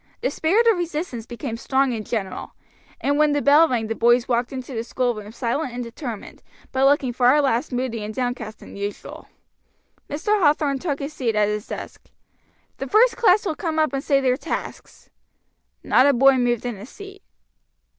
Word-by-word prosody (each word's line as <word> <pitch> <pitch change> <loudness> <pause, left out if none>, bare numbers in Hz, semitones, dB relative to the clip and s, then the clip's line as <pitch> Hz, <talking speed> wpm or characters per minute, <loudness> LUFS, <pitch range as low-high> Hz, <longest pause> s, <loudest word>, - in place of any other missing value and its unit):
The 485 - 0
spirit 395 +9 +2
of 450 -6 +4
resistance 305 -9 -4
became 240 -1 -5
strong 265 +1 +1
and 220 -2 -4
general, 200 -4 -5 0.4
and 285 +1 0
when 300 -1 +4
the 290 - +1
bell 295 +3 +6
rang 235 -3 0
the 220 - -2
boys 240 +2 +3
walked 240 0 0
into 260 0 -7
the 225 -1 -3
schoolroom 235 -4 -2
silent 245 +3 -2
and 245 0 -4
determined, 235 -2 -8 0.3
but 265 +1 +3
looking 275 -3 +2
far 250 +4 +4
less 270 -1 0
moody 245 -3 -2
and 210 - -5
downcast 240 -2 -4
than - - -12
usual. 200 +1 -7 0.8
Mr. 410 +8 0
Hathorn 290 -3 +2
took 290 -4 -2
his 280 +2 -6
seat 235 -6 -1
at 210 -1 +2
his 210 0 -3
desk. - - -8 0.7
"The - - -5
first 455 +2 +4
class 415 -3 +3
will 335 - 0
come 320 0 -3
up 310 -2 +2
and 275 0 -2
say 280 -3 +3
their 255 -2 +1
tasks." - - -7 0.7
Not 260 - +4
a 285 - +5
boy 270 +1 +5
moved 245 -1 0
in 240 -4 -3
his 210 +6 -11
seat. 395 -1 -12
260 Hz, 185 wpm, -22 LUFS, 235-300 Hz, 0.8 s, bell